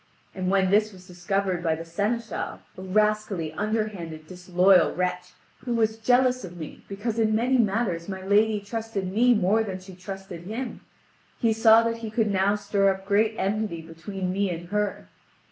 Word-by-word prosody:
And 185 Hz, -1 st, -2 dB
when 190 Hz, -1 st, +2 dB
this 215 Hz, +1 st, +3 dB
was 185 Hz, -2 st, -15 dB
discovered 185 Hz, 0 st, -2 dB
by 165 Hz, -2 st, +1 dB
the 165 Hz, +1 st, -7 dB
seneschal 210 Hz, +7 st, -3 dB
a -, -, -9 dB
rascally, 200 Hz, -4 st, 0 dB
underhanded, 205 Hz, -6 st, -3 dB
disloyal 180 Hz, +2 st, +3 dB
wretch, 180 Hz, 0 st, -2 dB, 0.3 s
who 240 Hz, -2 st, -3 dB
was 220 Hz, -1 st, +1 dB
jealous 250 Hz, +2 st, +3 dB
of 175 Hz, -1 st, -9 dB
me 155 Hz, -3 st, -9 dB
because 215 Hz, +3 st, -3 dB
in 215 Hz, -1 st, +2 dB
many 250 Hz, +3 st, +2 dB
matters 200 Hz, -5 st, 0 dB
my 190 Hz, -1 st, -5 dB
lady 210 Hz, +1 st, +3 dB
trusted 205 Hz, -3 st, -4 dB
me 245 Hz, +3 st, +4 dB
more 210 Hz, +2 st, +3 dB
than 190 Hz, -3 st, -5 dB
she 185 Hz, +1 st, -12 dB
trusted 185 Hz, -1 st, -8 dB
him, 235 Hz, +5 st, -5 dB, 0.6 s
he 230 Hz, -1 st, +2 dB
saw 225 Hz, 0 st, +6 dB
that 230 Hz, 0 st, -1 dB
he 230 Hz, -1 st, -6 dB
could 215 Hz, -1 st, 0 dB
now 195 Hz, +1 st, +2 dB
stir 200 Hz, -1 st, +1 dB
up 190 Hz, 0 st, -3 dB
great 215 Hz, +2 st, +2 dB
enmity 195 Hz, -4 st, -2 dB
between 180 Hz, +3 st, -5 dB
me 200 Hz, 0 st, 0 dB
and 175 Hz, 0 st, -6 dB
her. 205 Hz, -, -2 dB
200 Hz, 175 wpm, -26 LUFS, 185-220 Hz, 0.6 s, saw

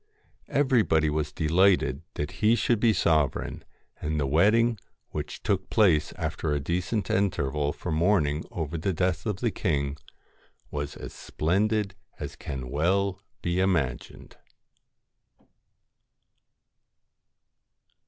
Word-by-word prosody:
LOCKS -, -, -3 dB
Everybody 105 Hz, -, +3 dB
was 75 Hz, 0 st, -1 dB
delighted 85 Hz, -2 st, +3 dB
that 75 Hz, 0 st, -3 dB
he 110 Hz, +2 st, +5 dB
should 120 Hz, -1 st, +1 dB
be 115 Hz, 0 st, +4 dB
sovereign, 80 Hz, -7 st, +1 dB, 0.4 s
and 75 Hz, 0 st, -1 dB
the 70 Hz, -, +1 dB
wedding, 105 Hz, -, +3 dB, 0.3 s
which -, -, -5 dB
took -, -, 0 dB
place 85 Hz, -7 st, +3 dB
after 80 Hz, -2 st, -3 dB
a 75 Hz, -, 0 dB
decent 90 Hz, +7 st, -1 dB
interval 75 Hz, -7 st, 0 dB
for 90 Hz, -, -5 dB
mourning 80 Hz, -3 st, +2 dB
over 80 Hz, -1 st, -4 dB
the 95 Hz, +4 st, 0 dB
death 90 Hz, +2 st, 0 dB
of 105 Hz, -3 st, -2 dB
the 120 Hz, -3 st, +1 dB
king, 70 Hz, -8 st, -1 dB, 0.8 s
was 75 Hz, 0 st, -4 dB
as -, -, -8 dB
splendid 100 Hz, +5 st, 0 dB, 0.3 s
as -, -, -6 dB
can 65 Hz, -3 st, -6 dB
well 95 Hz, +6 st, +1 dB, 0.2 s
be 85 Hz, +1 st, 0 dB
imagined. 85 Hz, -10 st, -1 dB
85 Hz, 115 wpm, -27 LUFS, 75-100 Hz, 0.8 s, he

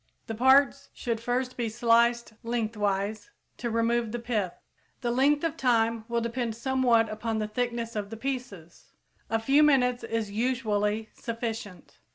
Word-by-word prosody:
The 225 Hz, -, -5 dB
parts 265 Hz, +3 st, +4 dB
should 230 Hz, -3 st, -3 dB
first 250 Hz, +2 st, -1 dB
be 235 Hz, -2 st, -2 dB
sliced 235 Hz, +1 st, +2 dB
lengthwise, 215 Hz, -, -2 dB, 0.3 s
to 240 Hz, -, -3 dB
remove 230 Hz, 0 st, +1 dB
the 240 Hz, -, -2 dB
pith. 220 Hz, -7 st, -2 dB, 0.5 s
The 240 Hz, -, 0 dB
length 285 Hz, +5 st, +3 dB
of 325 Hz, -2 st, 0 dB
time 230 Hz, -5 st, +1 dB
will 235 Hz, -1 st, 0 dB
depend 235 Hz, -1 st, -2 dB
somewhat 240 Hz, -2 st, +2 dB
upon 220 Hz, +1 st, -3 dB
the 215 Hz, -1 st, -1 dB
thickness 235 Hz, 0 st, -3 dB
of 205 Hz, -1 st, -3 dB
the 225 Hz, -, -7 dB
pieces. 235 Hz, -10 st, -6 dB, 0.4 s
A 225 Hz, -, +2 dB
few 270 Hz, +6 st, +3 dB
minutes 250 Hz, -5 st, +3 dB
is 225 Hz, -2 st, -2 dB
usually 215 Hz, -2 st, 0 dB
sufficient. 225 Hz, -4 st, -6 dB
230 Hz, 150 wpm, -28 LUFS, 220-250 Hz, 0.5 s, parts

